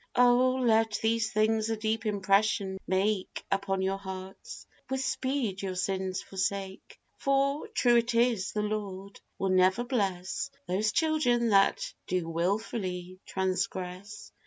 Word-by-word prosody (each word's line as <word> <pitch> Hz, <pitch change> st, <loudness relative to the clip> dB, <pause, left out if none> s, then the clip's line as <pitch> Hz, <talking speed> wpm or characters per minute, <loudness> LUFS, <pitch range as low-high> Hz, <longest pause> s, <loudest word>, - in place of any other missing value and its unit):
Oh! 250 Hz, +1 st, +5 dB
let 225 Hz, -4 st, +2 dB
these 225 Hz, 0 st, +1 dB
things 220 Hz, +1 st, +2 dB
a 225 Hz, -, -1 dB
deep 220 Hz, +1 st, -1 dB
impression 200 Hz, -1 st, +1 dB
make 190 Hz, +1 st, 0 dB
Upon 195 Hz, -1 st, 0 dB
your 195 Hz, +1 st, -1 dB
hearts, 190 Hz, 0 st, -8 dB, 0.2 s
with 265 Hz, 0 st, -1 dB
speed 260 Hz, -7 st, -1 dB
your 190 Hz, -2 st, -3 dB
sins 190 Hz, 0 st, -2 dB
forsake; 195 Hz, 0 st, -4 dB, 0.2 s
For, 275 Hz, +6 st, +1 dB
true 245 Hz, -, +3 dB
it 235 Hz, 0 st, +1 dB
is, 230 Hz, -5 st, +2 dB
the 210 Hz, -, -1 dB
Lord 200 Hz, -2 st, -5 dB, 0.2 s
will 195 Hz, -, -1 dB
never 185 Hz, +4 st, +3 dB
bless 190 Hz, -, -2 dB, 0.2 s
Those 205 Hz, +4 st, +1 dB
children 245 Hz, -6 st, +2 dB
that 195 Hz, -2 st, +3 dB
do 180 Hz, -2 st, -1 dB
wilfully 185 Hz, +1 st, -2 dB
transgress. 190 Hz, +1 st, -3 dB
200 Hz, 130 wpm, -29 LUFS, 190-230 Hz, 0.2 s, Oh